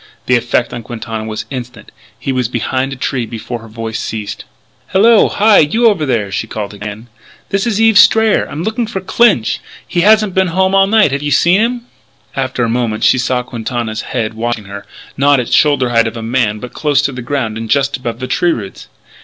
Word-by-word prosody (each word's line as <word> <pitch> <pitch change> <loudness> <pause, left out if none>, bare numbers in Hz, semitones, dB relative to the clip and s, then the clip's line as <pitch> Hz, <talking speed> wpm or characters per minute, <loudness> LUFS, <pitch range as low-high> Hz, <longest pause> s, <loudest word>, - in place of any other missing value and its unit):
The 125 - +3
effect 120 0 0
on 120 - -5
Quintana 115 -1 -6
was 110 0 -5
instant; 125 -3 -8 0.3
he 135 - -3
was 130 -3 0
behind 130 +2 -2
a - - -4
tree 125 -2 -2
before 115 +2 -6
her 115 - -13
voice 115 0 -5
ceased. 105 -2 -5 0.4
"Hallo! 220 +3 +4
Hi! 210 0 +4
You 220 +11 +3
over 180 -9 +1
there!" 110 -6 -1
she 110 - -3
called 105 -2 -5
again. 105 +3 -8 0.4
"This 195 +3 0
is 220 -3 0
Eve 225 -2 +5
Strayer. 220 -1 +4
I'm 150 +4 -5
looking 220 +3 -2
for 210 -4 -4
Clinch! 190 - +2 0.3
He 175 - 0
hasn't 215 0 +4
been 190 0 +2
home 190 +2 +1
all 195 0 +4
night. 215 -7 +4
Have 140 +1 -2
you 145 - -2
seen 175 +8 +3
him?" 240 +1 0 0.5
After 130 -2 -1
a - - +1
moment 115 -2 -1
she 130 - +4
saw 125 0 0
Quintana's 115 -2 -4
head 110 -3 -3
watching 115 -1 -3
her, 100 +1 -9 0.3
not 140 0 +4
at 125 - -1
the - - -5
shoulder 140 -4 +3
height 115 -1 +3
of 115 - -6
a 115 - -6
man 115 -2 0
but 125 +3 -9
close 145 -2 +1
to 145 - 0
the 125 -1 -7
ground 120 -3 -2
and 115 0 -6
just 140 +2 +1
above 120 -3 -5
the 130 - -4
tree 170 +6 +1
roots. 100 -4 -8
125 Hz, 215 wpm, -15 LUFS, 115-175 Hz, 0.5 s, Eve